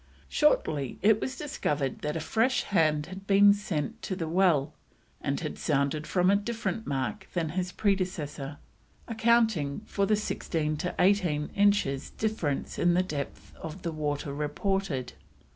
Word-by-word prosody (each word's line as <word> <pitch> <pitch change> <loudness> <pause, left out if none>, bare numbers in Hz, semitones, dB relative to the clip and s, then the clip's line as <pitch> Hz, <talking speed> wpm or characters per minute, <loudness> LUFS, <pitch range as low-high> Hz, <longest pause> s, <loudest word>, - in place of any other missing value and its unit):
Shortly 150 - +1
it 215 +1 +5
was 260 -1 -3
discovered 150 - -2
that 150 +1 -3
a - - -1
fresh 230 +9 +1
hand 155 -6 +2
had 190 +3 -10
been 200 0 +7
sent 190 -8 -3
to 190 - -3
the 165 -3 -3
well 160 -4 +2 0.5
and - - -1
had - - -5
sounded 140 +3 0
from 180 0 +3
a - - +5
different 225 +1 -2
mark 145 +9 -2
than 165 -3 0
his 180 +3 -2
predecessor, 175 -9 -2 0.5
accounting 220 -10 +2
for 200 -2 0
the 215 - +4
sixteen 160 -7 -2
to 180 +3 -3
eighteen 180 -6 +2
inches 200 -10 +2
difference 210 -11 -2
in 175 0 +3
the 180 - +3
depth 150 -6 -6
of 165 +3 -8
water 150 -3 -2
reported. 150 -2 -2
180 Hz, 145 wpm, -28 LUFS, 150-205 Hz, 0.5 s, been